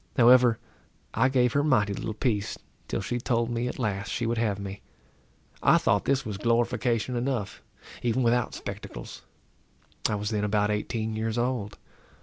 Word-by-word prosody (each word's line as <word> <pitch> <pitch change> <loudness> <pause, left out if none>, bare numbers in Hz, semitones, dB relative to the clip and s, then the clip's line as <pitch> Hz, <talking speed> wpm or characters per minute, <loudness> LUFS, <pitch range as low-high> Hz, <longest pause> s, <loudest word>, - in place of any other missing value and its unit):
However, 120 -1 +6 0.6
I 130 +4 +3
gave 125 -2 +2
her 145 - +2
mighty 105 -9 +2
little 105 +2 -4
peace, 105 -4 -1 0.3
till - - -2
she 120 +5 -2
told 120 -1 0
me 120 +1 -1
at - - -5
last 100 -4 -2
she 120 - -1
would 115 0 0
have 105 -4 0
me. 100 0 -7 0.8
I - - +6
thought 100 0 +1
this 135 -1 +1
was 105 -4 -4
glorification 120 +1 +1
enough, 120 -4 -2 0.4
even 125 +2 +1
without 120 +1 +1
spectacles. - - -7 0.9
I 105 - 0
was 105 +1 -3
then 105 -1 0
about 105 0 +1
eighteen 110 +1 -2
years 110 +1 -2
old. 120 -4 -1
115 Hz, 160 wpm, -27 LUFS, 105-125 Hz, 0.9 s, However